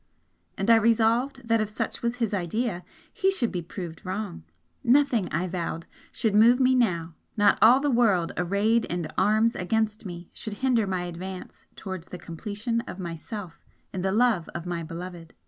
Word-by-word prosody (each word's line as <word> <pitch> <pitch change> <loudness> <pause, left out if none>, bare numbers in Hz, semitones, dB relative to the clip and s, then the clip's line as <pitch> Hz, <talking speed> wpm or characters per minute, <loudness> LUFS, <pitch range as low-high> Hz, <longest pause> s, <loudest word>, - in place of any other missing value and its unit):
And 195 +4 +2
I 230 - +8
resolved 230 +3 +2
that 230 -1 +3
if 215 - -2
such 215 - -4
was 235 0 -1
his 230 -4 -1
idea, 190 +1 -1 0.3
he 380 - +2
should 270 - 0
be 180 - -2
proved 170 -1 -8
wrong. 190 - -4 0.4
Nothing, 245 -7 +3
I 165 +4 0
vowed, 170 -2 -4 0.3
should 220 -4 0
move 230 +4 +6
me 260 0 +4
now 175 -10 +1 0.2
not 205 -1 +4
all 240 +4 +8
the 290 0 +1
world 205 -9 +3
arrayed 200 +6 +2
in 175 -2 -3
arms 220 +2 +3
against 215 +3 -1
me 175 -1 -9
should 215 - -6
hinder 235 -5 +3
my 185 -2 -1
advance 180 +2 -8
towards 185 -3 -7
the 180 - -7
completion 210 +7 -3
of - - -7
myself 175 +1 -7 0.3
in 185 - -3
the 190 +1 0
love 220 -5 +2
of 170 0 -5
my 175 -1 -3
Beloved! 170 +1 -8
205 Hz, 175 wpm, -26 LUFS, 175-230 Hz, 0.4 s, I